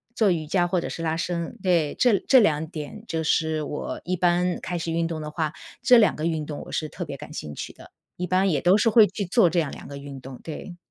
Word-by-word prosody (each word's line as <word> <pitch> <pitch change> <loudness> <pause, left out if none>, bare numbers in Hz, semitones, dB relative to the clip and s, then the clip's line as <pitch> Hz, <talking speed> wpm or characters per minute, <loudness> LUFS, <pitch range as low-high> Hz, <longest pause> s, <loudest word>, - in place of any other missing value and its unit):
做 210 -4 +3
瑜 155 -3 -2
伽 175 +1 +2
或 175 0 0
者 - - -4
是 165 - -5
拉 160 0 0
伸， 170 +5 -3
对， 170 -6 +2
这 240 -5 +5
这 265 - +7
2 160 -7 +2
点 160 +7 -7
就 160 -5 -2
是 160 -1 +1
我 150 - -5
一 185 - 0
般 180 0 +1
开 175 - -3
始 165 0 -3
运 165 0 +1
动 165 -2 -4
的 150 0 -5
话， 155 -1 -2 0.3
这 250 - +7
2 220 -3 +4
个 155 - -3
运 160 -2 -1
动 145 -1 -6
我 - - -10
是 155 - -2
特 175 - -6
别 140 -3 -6
感 150 - -10
兴 75 - -6
趣 - - -7
的， - - -15 0.2
一 180 - -3
般 185 +2 +2
也 145 -5 +1
都 180 +3 +5
是 225 +2 +3
会 220 0 +7
去 200 - -4
做 185 -1 +4
这 175 - +1
样 155 -4 0
2 - - -10
个 140 - -7
运 140 -1 -9
动， 130 -1 -10
对。 175 +3 -8
165 Hz, 270 characters per minute, -25 LUFS, 155-185 Hz, 0.3 s, 这